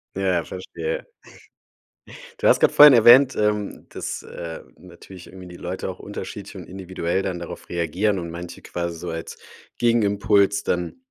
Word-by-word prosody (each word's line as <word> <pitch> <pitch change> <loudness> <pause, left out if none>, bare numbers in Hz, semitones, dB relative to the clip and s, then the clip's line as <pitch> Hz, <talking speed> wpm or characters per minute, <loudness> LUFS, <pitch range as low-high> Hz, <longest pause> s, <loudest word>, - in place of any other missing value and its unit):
Ja, 95 -3 0
verstehe. 475 - -5 1.4
Du - - +3
hast - - +5
gerade - - +4
vorhin 145 -2 +10
erwähnt. 125 +3 +7
Ähm, 105 -1 -1
dass, - - -5
äh, 85 -1 -8 0.2
natürlich 95 -2 -14
irgendwie 95 -1 -12
die 90 - -11
Leute 90 +2 -5
auch 95 - -7
unterschiedlich 105 0 -8
und 90 - -8
individuell 95 -1 -3
dann 90 -2 -3
darauf 85 - -9
reagieren 90 +5 -1
und 85 -2 -5
manche 85 +1 -8
quasi 85 -1 -5
so 90 - -6
als 80 0 -6 0.4
Gegenimpuls 100 -3 +2
dann 90 -1 -2
95 Hz, 150 wpm, -23 LUFS, 85-105 Hz, 1.4 s, vorhin